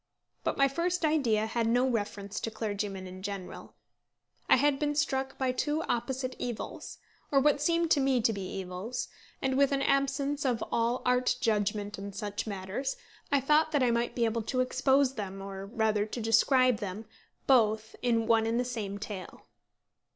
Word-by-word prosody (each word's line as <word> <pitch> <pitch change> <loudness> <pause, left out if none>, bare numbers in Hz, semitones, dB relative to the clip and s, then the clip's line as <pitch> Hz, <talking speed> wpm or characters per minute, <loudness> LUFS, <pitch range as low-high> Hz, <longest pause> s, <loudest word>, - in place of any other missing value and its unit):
But - - -1
my 275 - +5
first 340 +4 0
idea 245 -9 +2
had 225 +1 -1
no 245 +3 +3
reference 205 -4 -3
to - - -3
clergymen 205 -3 -4
in 185 0 -9
general. 195 -2 -7 0.7
I - - +8
had 280 +1 +2
been 295 -1 0
struck 270 -2 -1
by 260 -1 +1
two 295 +5 -1
opposite 255 +1 -2
evils, 240 -3 -5 0.3
or 275 - +5
what 285 +1 +3
seemed 335 +1 +1
to 290 - +5
me 265 -2 +2
to 225 0 +2
be 200 - -5
evils, 190 +6 -5 0.3
and 265 -1 +1
with 280 0 +4
an 275 -1 +1
absence 275 +1 +1
of 245 -4 0
all 235 +2 0
art 250 0 +2
judgment 205 -1 0
in 200 0 -6
such 205 +2 -4
matters, 200 +7 -3 0.3
I 280 -1 +3
thought 305 +3 +3
that 285 -3 +3
I 245 - +3
might 235 +1 0
be 235 - +2
able 230 0 0
to 255 +4 -2
expose 265 +1 +2
them, 195 -4 -5
or 195 0 -7
rather 215 -1 0
to 230 - -5
describe 245 +2 +4
them, 205 +1 -5 0.4
both 220 -4 +3
in 230 -2 +2
one 225 -1 +3
and 230 +1 +1
the 250 - 0
same 215 -5 -4
tale. 200 -4 -8
235 Hz, 180 wpm, -30 LUFS, 210-270 Hz, 0.7 s, I